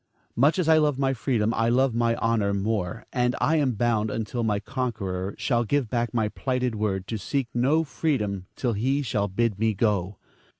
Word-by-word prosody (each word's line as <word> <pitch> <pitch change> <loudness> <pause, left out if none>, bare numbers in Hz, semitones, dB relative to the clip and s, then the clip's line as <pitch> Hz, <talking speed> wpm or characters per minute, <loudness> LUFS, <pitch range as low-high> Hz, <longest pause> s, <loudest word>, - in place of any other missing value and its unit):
Much 145 +8 +3
as 180 -4 0
I 160 -1 +6
love 150 -3 +2
my 135 -1 +1
freedom, 115 -2 0
I 115 +1 +1
love 130 +1 +3
my 115 0 +1
honor 110 -4 +1
more; 100 0 -2
and 125 -1 +1
I 155 +6 +2
am 140 -4 +2
bound 110 -1 +1
until 115 +2 -3
my 105 -2 +1
conqueror 100 -6 -3
shall 120 -3 +1
give 125 0 0
back 120 -1 0
my 110 -3 +1
plighted 125 0 -1
word, 100 -3 -1
to 110 - -3
seek 135 +5 -2
no 140 +7 +2
freedom 105 - -2
till 120 -3 -1
he 135 +7 0
shall 105 -5 0
bid 105 +1 -1
me 110 -1 +1
go. 100 -2 0
115 Hz, 195 wpm, -25 LUFS, 105-130 Hz, -, I